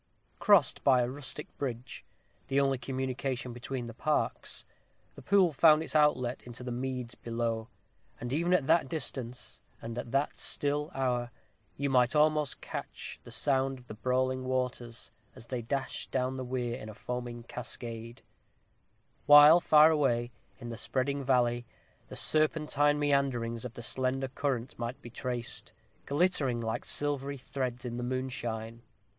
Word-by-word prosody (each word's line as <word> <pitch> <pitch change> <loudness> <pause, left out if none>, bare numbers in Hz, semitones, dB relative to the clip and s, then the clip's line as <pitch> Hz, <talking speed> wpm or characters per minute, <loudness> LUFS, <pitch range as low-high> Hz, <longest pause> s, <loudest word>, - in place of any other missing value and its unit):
Crossed 200 - +4
by 130 -3 +5
a - - -1
rustic 145 +2 -7
bridge, 125 -1 -5 0.4
the 140 0 +2
only 135 -2 +2
communication 130 -1 -3
between 120 +1 -5
the 115 - -7
parks, 150 +6 -1 0.5
the - - -12
pool 185 +2 +4
found 155 +2 +6
its 160 - -4
outlet 130 -5 +3
into 120 +1 -8
the 125 - -4
meads 125 -1 -3
below; 115 -1 -3 0.5
and 120 +2 -4
even 170 +4 +1
at 180 -7 +3
that 160 -3 +3
distance, 125 - -5 0.2
and 115 0 -6
in 120 0 -5
that 135 +3 0
still 145 +1 +1
hour, 125 -2 0 0.5
you 140 - -1
might 125 0 +3
almost 150 -1 +2
catch - - -7
the - - -12
sound 135 -1 +1
of 125 - -16
the - - -7
brawling 130 +3 0
waters, 125 -2 -3 0.2
as - - -12
they 120 0 -3
dashed 135 +4 -3
down 130 0 -1
the 130 - -4
weir 125 -1 -2
in 110 - -8
a 110 - -9
foaming 120 0 -5
cascade; 115 -1 -6 1.0
while, 145 +3 +10
far 155 0 +7
away, 125 -6 +1 0.3
in 120 -2 -7
the 115 - -6
spreading 140 +4 -1
valley, 120 -2 +2 0.4
the - - -9
serpentine 150 -1 +2
meanderings 135 -6 0
of 125 -2 -7
the 120 - -7
slender 130 +2 -1
current 130 -3 -2
might 120 +2 -4
be 120 - -11
traced, 120 -1 -3 0.3
glittering 145 -5 +2
like 115 -1 -3
silvery 140 -1 -1
threads 125 -1 -4
in 120 -1 -4
the 125 - -3
moonshine. 120 -3 -3
130 Hz, 150 wpm, -30 LUFS, 120-140 Hz, 1.0 s, while